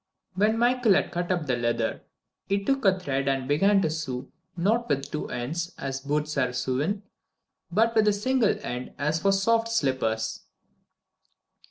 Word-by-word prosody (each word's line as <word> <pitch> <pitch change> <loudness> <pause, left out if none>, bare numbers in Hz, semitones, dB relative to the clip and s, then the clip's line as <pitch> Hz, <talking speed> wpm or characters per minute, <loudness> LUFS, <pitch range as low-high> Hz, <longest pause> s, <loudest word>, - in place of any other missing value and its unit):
When 210 +4 +2
Michael 240 -3 +3
had - - +1
cut 175 +1 -2
up 175 -4 0
the 130 -3 +1
leather, 120 -1 -1 0.5
he 200 0 0
took 270 +2 +1
a 190 -1 +4
thread 140 -5 -2
and 135 -1 0
began 195 +7 +3
to - - +1
sew 135 -5 -4 0.3
not 220 +7 +1
with 140 0 -1
two 150 - -4
ends, 160 +9 -4
as 135 -1 -4
boots 150 +1 -1
are 125 -2 +1
sewn, 135 +11 -1 0.7
but 225 +5 +3
with 220 -2 +3
a 210 - +5
single 230 +2 +2
end, 125 +1 -5
as 155 +3 0
for 195 - +3
soft 225 +4 +2
slippers. 115 - 0
165 Hz, 165 wpm, -26 LUFS, 135-205 Hz, 0.7 s, a